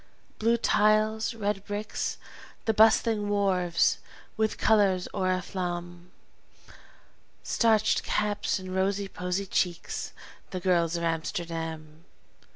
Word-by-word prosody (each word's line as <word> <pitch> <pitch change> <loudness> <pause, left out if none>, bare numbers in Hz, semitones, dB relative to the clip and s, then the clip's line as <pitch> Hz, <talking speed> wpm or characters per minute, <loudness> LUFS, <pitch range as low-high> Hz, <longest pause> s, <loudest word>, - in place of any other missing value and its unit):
Blue 230 +2 +3
tiles, 215 +1 +2
red 205 -2 -2
bricks, 205 +1 -3 0.5
the 220 - +2
bustling 220 -1 +4
wharves, 185 -4 +2 0.4
with 220 0 0
color's 200 -4 +3
oriflamme; 180 -2 -3 1.3
Starched 220 -2 +2
caps 210 -1 0
and 185 -1 -7
rosy 195 +1 0
posy 180 +1 -3
cheeks 180 -2 -2 0.4
the 185 - -4
girls 175 -2 +2
of 170 - -4
Amsterdam! 165 -1 -4
190 Hz, 95 wpm, -28 LUFS, 175-210 Hz, 1.3 s, bustling